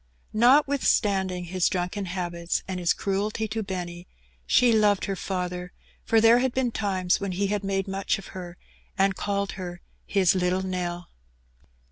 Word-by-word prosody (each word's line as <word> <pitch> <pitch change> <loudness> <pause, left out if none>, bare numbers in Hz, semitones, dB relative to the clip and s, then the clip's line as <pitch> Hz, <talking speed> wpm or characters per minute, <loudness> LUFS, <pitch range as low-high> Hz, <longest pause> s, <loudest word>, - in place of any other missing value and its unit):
Notwithstanding 215 -7 +3
his 180 +1 0
drunken 185 +2 -2
habits 175 -2 -3
and 185 -1 -3
his 175 -1 +2
cruelty 210 +3 -1
to 220 +1 -2
Benny, 175 -3 -5 0.4
she 245 -2 +5
loved 210 -2 +3
her 195 - -2
father, 180 -1 -4 0.3
for 225 - +3
there 225 +2 +6
had 260 -1 0
been 255 -2 +1
times 190 -5 0
when 200 -2 -3
he 195 +3 0
had 205 -1 -2
made 195 0 -1
much 195 0 -1
of 195 - -11
her, 180 -1 -8 0.4
and 195 0 +3
called 200 0 -2
her 175 -2 -7 0.3
"his 190 -3 +3
little 185 0 0
Nell." 180 -2 -4
190 Hz, 155 wpm, -26 LUFS, 180-205 Hz, 0.4 s, there